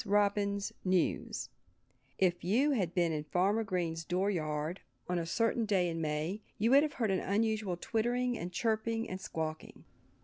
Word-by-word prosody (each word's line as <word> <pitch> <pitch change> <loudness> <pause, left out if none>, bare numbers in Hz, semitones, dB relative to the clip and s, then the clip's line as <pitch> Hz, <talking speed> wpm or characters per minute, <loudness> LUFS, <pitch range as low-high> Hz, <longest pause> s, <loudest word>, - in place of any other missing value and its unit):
ROBIN'S 200 0 +1
NEWS* 185 -2 0 0.7
If 180 -2 +2
you 245 - +3
had 190 - 0
been 170 -2 +3
in 150 -1 -2
Farmer 195 +8 +2
Green's 170 -5 -2
door 185 +4 0
yard 155 0 -2 0.3
on 180 -1 0
a 165 - -3
certain 230 +5 +1
day 195 -4 +2
in 165 0 -3
May 155 +6 -2 0.2
you 225 +4 +2
would 275 +1 +8
have 300 -1 -1
heard 225 -6 0
an 190 - +2
unusual 210 -2 0
twittering 240 +5 0
and 175 -4 -5
chirping 225 +2 0
and 185 +1 -5
squawking. 160 -2 -5
195 Hz, 165 wpm, -33 LUFS, 175-220 Hz, 0.7 s, would